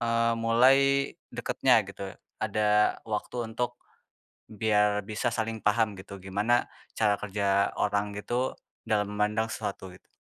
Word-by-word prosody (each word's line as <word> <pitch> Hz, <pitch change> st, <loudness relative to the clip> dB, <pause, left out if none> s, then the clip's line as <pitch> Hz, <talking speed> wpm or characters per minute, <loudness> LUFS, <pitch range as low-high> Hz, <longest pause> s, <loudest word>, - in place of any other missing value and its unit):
eee, 115 Hz, 0 st, +2 dB
mulai 115 Hz, +4 st, +5 dB, 0.6 s
deketnya -, -, +2 dB
gitu. -, -, -9 dB, 0.4 s
Ada 105 Hz, 0 st, +2 dB
waktu 110 Hz, +2 st, -4 dB, 0.2 s
untuk 120 Hz, +1 st, -2 dB, 0.7 s
biar 105 Hz, -1 st, +2 dB
bisa 105 Hz, +3 st, -2 dB
saling 115 Hz, -1 st, -2 dB
paham 105 Hz, 0 st, +2 dB
gitu 100 Hz, +1 st, -9 dB
gimana 105 Hz, +6 st, +1 dB, 0.3 s
cara 105 Hz, -2 st, +3 dB
kerja 100 Hz, -1 st, +1 dB
orang 100 Hz, 0 st, +1 dB
itu 125 Hz, +5 st, -2 dB, 0.3 s
dalam 105 Hz, -2 st, +2 dB
memandang 105 Hz, +2 st, 0 dB
sesuatu 100 Hz, -3 st, -5 dB
gitu. -, -, -19 dB
105 Hz, 125 wpm, -28 LUFS, 105-115 Hz, 0.7 s, mulai